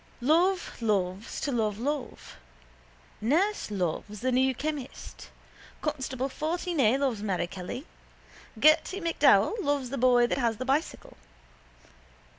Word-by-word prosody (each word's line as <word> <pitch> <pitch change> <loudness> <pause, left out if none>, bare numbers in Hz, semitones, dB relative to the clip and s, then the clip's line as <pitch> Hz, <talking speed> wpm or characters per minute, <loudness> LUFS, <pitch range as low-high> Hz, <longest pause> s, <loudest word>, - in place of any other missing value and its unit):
Love 340 +5 +1
loves 200 -2 -1
to 285 - -2
love 215 -4 0
love. 280 +3 -4 0.8
Nurse 340 - +1
loves 200 +2 -3
the 255 +1 0
new 260 +1 +2
chemist. 295 0 -6 0.5
Constable 265 -3 -3
14A 310 - 0
loves 260 -7 -1
Mary 195 -4 -1
Kelly. 185 - -7 0.7
Gerty 310 - +4
MacDowell 350 +5 +3
loves 280 -4 -1
the 275 - -3
boy 245 -1 +5
that 240 - -1
has 230 -3 0
the 255 - -4
bicycle. 275 +5 -2
260 Hz, 115 wpm, -28 LUFS, 225-305 Hz, 0.8 s, boy